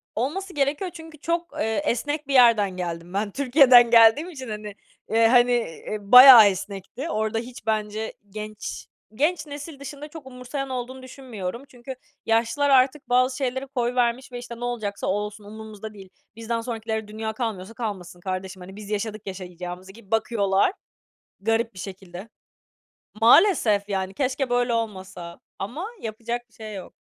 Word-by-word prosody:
Olması 360 - -3
gerekiyor 290 +6 -1
çünkü 320 -2 -11
çok, 335 +3 -2
eee, 220 -2 0
esnek 290 +5 -2
bir 280 - -2
yerden 225 -7 +5
geldim 170 0 -5
ben. 205 +1 -1
Türkiye'den 255 -3 +6
geldiğim 235 +9 +6
için, 260 -8 -8
hani, 210 -1 -6 0.3
eee, 225 +1 +4
hani, 245 +1 +5
eee, 215 -3 -2
bayağı 250 +1 +10
esnekti. 200 - -5
Orada 220 -1 -1
hiç 240 -1 -10
bence 215 0 -2 0.2
genç, 215 +1 -7 0.3
genç 310 +5 0
nesil 290 0 -8
dışında 285 +2 -8
çok 305 -2 -11
umursayan 265 +2 -6
olduğunu 260 +1 -5
düşünmüyorum. 245 -4 -7
Çünkü 255 +1 -9 0.3
yaşlılar 230 +5 +1
artık 265 0 +3
bazı 255 +1 +2
şeyleri 265 0 -2
koyvermiş 250 0 -1
ve 245 - -6
işte, 240 -1 -9
"Ne - - -6
olacaksa 215 -4 -3
olsun, 210 +1 -3
umurumuzda 215 0 -9
değil, 195 -2 -13 0.3
bizden 230 0 -3
sonrakilere 220 -2 -4
dünya 220 +1 -5
kalmıyorsa 220 -3 -4
kalmasın 190 -7 -6
kardeşim," 185 +1 -5
hani, 190 +2 -10
"Biz 210 -1 -10
yaşadık 215 0 -4
yaşayacağımızı," 180 0 -7
gibi 205 -1 -18
bakıyorlar. 215 - +2 0.7
Garip 225 +2 0
bir 185 - -12
şekilde. 190 +1 -9 0.9
Maalesef 225 - +5
yani 190 -1 -2
keşke 265 +2 -1
böyle 245 -1 +1
olmasa. 190 -6 -5 0.2
Ama 250 - -5
yapacak 235 +2 -5
bir 225 - -31
şey 215 -1 -9
yok. 190 - -9
230 Hz, 150 wpm, -24 LUFS, 205-260 Hz, 0.9 s, bayağı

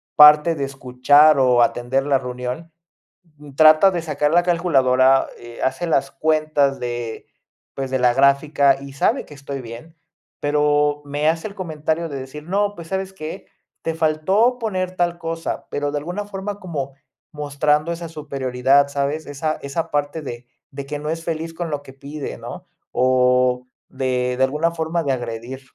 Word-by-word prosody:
parte 150 +2 +7
de 140 - -3
escuchar 135 +3 +4
o 125 -2 +4
atender 130 +4 0
la 140 -2 +3
reunión. 125 +5 -6 0.7
Mm, 145 -1 -13
trata 155 +5 +7
de 175 - -2
sacar 150 -2 0
la 175 +1 +4
calculadora, 135 -7 +3
eh, 120 0 -11
hace 130 +7 -1
las 135 -3 +1
cuentas 155 -2 +1
de, 120 -2 -5 0.5
pues, 135 -1 -4
de 130 - 0
la 125 -1 +4
gráfica, 140 +1 +3
y 140 -1 -9
sabe 230 - +1
que - - -13
estoy 140 -1 -6
bien, 120 +8 -10 0.5
pero 145 0 +2
me 145 +2 -1
hace 165 +5 -1
el 200 - -11
comentario 160 -2 -2
de 140 - -5
decir: 135 +3 -9
"No, 205 +4 0
pues, 170 -3 -10
¿sabes 190 0 -3
qué? 155 -4 -8 0.4
Te 165 - -2
faltó 165 +10 +2
poner 185 -5 -2
tal 175 -1 0
cosa", 165 0 -4
pero 145 0 -2
de 145 - -2
alguna 180 +7 -5
forma, 205 0 -6
como 140 -7 -5 0.4
mostrando 150 +2 0
esa 170 0 -5
superioridad, 140 -2 +1
¿sabes? 140 +3 -2
Esa 150 +2 -3
esa 160 +4 -3
parte 145 +2 -1
de 120 -4 -7 0.3
de 140 0 -7
que 145 +1 -5
no 150 +1 -5
es 165 0 -3
feliz 165 0 -4
con 170 0 -4
lo 145 -1 -2
que 135 - -13
pide, 140 +2 -7
¿no? - - -9 0.3
O, 125 0 +2 0.2
de 125 -1 -1
de 130 - +2
alguna 150 +5 +1
forma 165 0 -2
de 140 - 0
agredir 120 +1 -5
145 Hz, 170 wpm, -21 LUFS, 135-165 Hz, 0.7 s, parte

